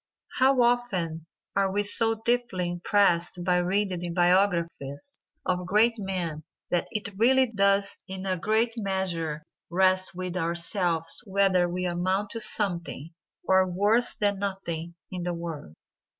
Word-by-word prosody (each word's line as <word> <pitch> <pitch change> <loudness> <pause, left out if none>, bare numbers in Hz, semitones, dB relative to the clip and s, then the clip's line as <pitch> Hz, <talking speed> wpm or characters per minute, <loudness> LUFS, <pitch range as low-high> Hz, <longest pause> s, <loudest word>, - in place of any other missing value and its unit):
How 260 -1 +5
often 185 -10 0 0.3
are 195 -1 +2
we 205 +1 +1
so 225 +2 +3
deeply 235 -7 0
impressed 175 -1 +1
by 180 0 +2
reading 185 +1 0
the 175 0 -4
biographies 175 - 0 0.3
of 180 -1 -1
great 225 +4 +3
men 180 -6 -3 0.3
that 175 - 0
it 205 -2 -5
really 260 +3 +5
does 200 -3 +1
in 190 0 -6
a 190 -1 0
great 220 +6 +1
measure 180 -7 -2 0.3
rest 185 +1 +2
with 180 0 -4
ourselves 170 -1 -1
whether 190 -2 +2
we 180 +1 -3
amount 185 +3 -1
to 230 - 0
something, 170 -7 0 0.3
or 190 0 +4
worse 210 +7 +2
than 205 -3 0
nothing, 175 -4 -4 0.2
in 185 -1 -4
the 175 0 -2
world. 165 - -7
185 Hz, 135 wpm, -27 LUFS, 175-205 Hz, 0.3 s, How